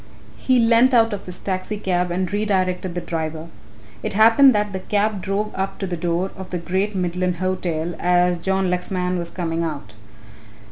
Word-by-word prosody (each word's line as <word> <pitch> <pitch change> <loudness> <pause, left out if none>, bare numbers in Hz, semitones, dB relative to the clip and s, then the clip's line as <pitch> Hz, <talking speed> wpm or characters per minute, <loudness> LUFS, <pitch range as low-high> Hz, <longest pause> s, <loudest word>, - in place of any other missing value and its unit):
He 255 -1 +1
leant 235 +2 +5
out 225 -2 +4
of 200 - -6
his 180 - -6
taxi 190 +2 -3
cab 180 -3 0
and 180 +1 -2
redirected 185 -3 0
the 175 - -2
driver. 160 -1 -4 0.5
It - - -3
happened 225 +5 +6
that 210 -1 0
the 190 - -3
cab 205 +1 0
drove 200 +3 -2
up 195 0 -3
to 195 - -3
the 180 -2 -3
door 175 +3 -1
of 190 -1 -8
the 180 - -2
Great 190 +4 -2
Midland 180 0 -1
Hotel 175 -2 -2
as 180 0 +2
John 190 +1 0
Lexman 180 0 -1
was 170 -1 -4
coming 170 -2 -2
out. 145 -10 -5
185 Hz, 180 wpm, -21 LUFS, 175-205 Hz, 0.5 s, happened